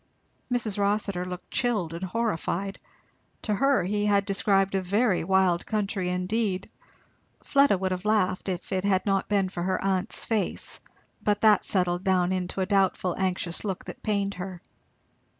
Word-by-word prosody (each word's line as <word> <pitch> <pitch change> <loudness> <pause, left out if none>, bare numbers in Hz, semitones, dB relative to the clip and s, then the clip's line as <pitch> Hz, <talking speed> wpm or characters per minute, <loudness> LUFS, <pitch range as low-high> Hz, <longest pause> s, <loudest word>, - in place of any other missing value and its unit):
Mrs. 220 -4 0
Rossitur 200 -2 0
looked 180 0 -8
chilled 220 -10 0
and 170 - -6
horrified. 195 -2 -2 0.6
To 215 - 0
her 275 +1 +2
he 205 +3 0
had 200 -1 +3
described 195 -1 +2
a 190 - +1
very 200 +1 +1
wild 185 -1 +2
country 200 -3 -2
indeed. 185 +1 -1 0.7
Fleda 280 -7 +4
would 190 0 -2
have 180 0 -3
laughed 200 -3 +1
if 180 +1 -4
it 185 -1 0
had 195 -2 +1
not 195 -1 0
been 200 -2 +2
for 180 -2 -5
her 185 +2 0
aunt's 190 -1 +1
face; 215 -5 -1 0.4
but 205 -1 0
that 215 -2 +5
settled 180 -2 0
down 185 -2 +2
into 185 +1 -2
a - - +1
doubtful 190 -3 +1
anxious 180 -2 -2
look 195 -4 -4
that - - -9
pained 200 -2 0
her. 185 -1 -6
195 Hz, 160 wpm, -26 LUFS, 185-210 Hz, 0.7 s, that